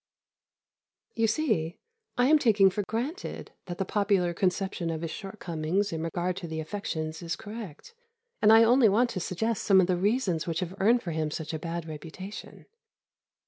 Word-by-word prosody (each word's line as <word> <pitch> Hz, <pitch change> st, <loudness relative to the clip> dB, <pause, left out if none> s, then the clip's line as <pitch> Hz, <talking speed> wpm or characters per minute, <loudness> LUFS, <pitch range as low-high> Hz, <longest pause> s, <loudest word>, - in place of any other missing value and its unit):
You 225 Hz, -1 st, +2 dB
see, 215 Hz, -, 0 dB, 0.4 s
I 245 Hz, -, +4 dB
am 305 Hz, +3 st, +6 dB
taking 205 Hz, -7 st, +5 dB
for 205 Hz, -, -1 dB
granted 245 Hz, -, -4 dB
that 175 Hz, -1 st, -6 dB
the 195 Hz, -, -1 dB
popular 195 Hz, -4 st, +1 dB
conception 185 Hz, -1 st, -1 dB
of 160 Hz, -1 st, -3 dB
his 165 Hz, -, -3 dB
shortcomings 190 Hz, 0 st, -2 dB
in 160 Hz, -, -3 dB
regard 175 Hz, +2 st, -2 dB
to 175 Hz, -, -5 dB
the 160 Hz, 0 st, -4 dB
affections 160 Hz, -2 st, -4 dB
is 165 Hz, -2 st, -3 dB
correct, 210 Hz, -, -9 dB, 0.5 s
and 215 Hz, -, +6 dB
I 225 Hz, +1 st, +8 dB
only 240 Hz, 0 st, +5 dB
want 235 Hz, +5 st, +3 dB
to 190 Hz, -, -3 dB
suggest 215 Hz, +5 st, -2 dB
some 195 Hz, -2 st, +5 dB
of 185 Hz, -, +5 dB
the 180 Hz, 0 st, +1 dB
reasons 190 Hz, -4 st, 0 dB
which 165 Hz, +1 st, -1 dB
have 180 Hz, 0 st, -4 dB
earned 235 Hz, +5 st, +4 dB
for 170 Hz, -, -3 dB
him 155 Hz, -1 st, -1 dB
such 160 Hz, +1 st, -5 dB
a 160 Hz, -, -3 dB
bad 165 Hz, +1 st, -4 dB
reputation. 165 Hz, +6 st, -9 dB
190 Hz, 180 wpm, -28 LUFS, 165-215 Hz, 0.5 s, I